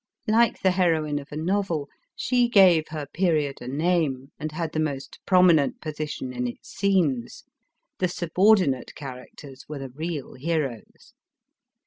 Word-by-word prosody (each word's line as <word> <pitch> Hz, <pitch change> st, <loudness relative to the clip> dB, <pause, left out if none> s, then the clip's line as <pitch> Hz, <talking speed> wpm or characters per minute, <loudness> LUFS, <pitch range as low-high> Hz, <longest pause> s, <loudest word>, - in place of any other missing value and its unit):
Like 225 Hz, +1 st, +3 dB
the 190 Hz, -, +5 dB
heroine 160 Hz, -5 st, +1 dB
of 140 Hz, -, -13 dB
a -, -, -6 dB
novel, 170 Hz, -3 st, -1 dB, 0.3 s
she 245 Hz, 0 st, +1 dB
gave 185 Hz, -8 st, +6 dB
her 155 Hz, -2 st, -5 dB
period 155 Hz, -3 st, 0 dB
a 120 Hz, -, -7 dB
name, 145 Hz, -2 st, 0 dB
and 155 Hz, 0 st, -4 dB
had 160 Hz, 0 st, -3 dB
the 155 Hz, -, -2 dB
most 140 Hz, -3 st, -3 dB
prominent 180 Hz, -6 st, +4 dB
position 150 Hz, -4 st, -5 dB
in 125 Hz, 0 st, -2 dB
its 120 Hz, -, -9 dB
scenes; 180 Hz, -, 0 dB, 0.6 s
the 185 Hz, -, +2 dB
subordinate 180 Hz, -4 st, +2 dB
characters 135 Hz, 0 st, -10 dB
were 150 Hz, -, -5 dB
the 135 Hz, -1 st, -6 dB
real 155 Hz, 0 st, -5 dB
heroes. 140 Hz, -5 st, -4 dB
155 Hz, 140 wpm, -25 LUFS, 140-180 Hz, 0.6 s, gave